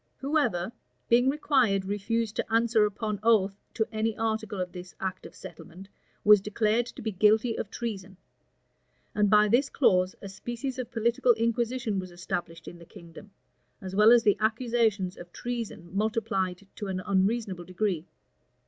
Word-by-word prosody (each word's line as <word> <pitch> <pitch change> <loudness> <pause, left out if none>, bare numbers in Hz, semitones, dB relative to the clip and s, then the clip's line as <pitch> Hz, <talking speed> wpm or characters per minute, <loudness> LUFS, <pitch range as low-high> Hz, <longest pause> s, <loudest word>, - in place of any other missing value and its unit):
Whoever, 270 - 0 0.4
being 245 +2 +5
required, 260 -9 +2
refused 210 +2 -2
to - - -3
answer 225 -1 +3
upon 210 0 -4
oath 210 -4 +3 0.2
to 220 - +1
any 220 0 -1
article 220 -2 -2
of 180 -1 -3
this 180 -1 -10
act 190 -1 -4
of - - -18
settlement, 185 +1 -11 0.3
was 210 -1 +7
declared 215 +3 0
to - - -10
be 220 - -2
guilty 215 +4 +3
of 200 - -4
treason; 195 -6 -6 1.0
and 210 -1 +2
by 210 +1 +5
this 245 +6 +2
clause 185 -8 +2
a 200 - -8
species 240 +6 -5
of 245 -2 -4
political 235 +2 +2
inquisition 230 -1 -1
was 185 -1 -6
established 175 -2 -5
in 175 - -9
the - - -12
kingdom, 170 +5 -13 0.5
as 190 -1 -7
well 210 +2 +7
as 240 -1 +6
the 205 -3 +3
accusations 220 -4 0
of 175 0 -11
treason 225 -8 -6
multiplied 205 -3 -1
to 205 - -5
an 185 -1 -3
unreasonable 195 -1 0
degree. 185 -2 -2
210 Hz, 155 wpm, -28 LUFS, 190-230 Hz, 1.0 s, was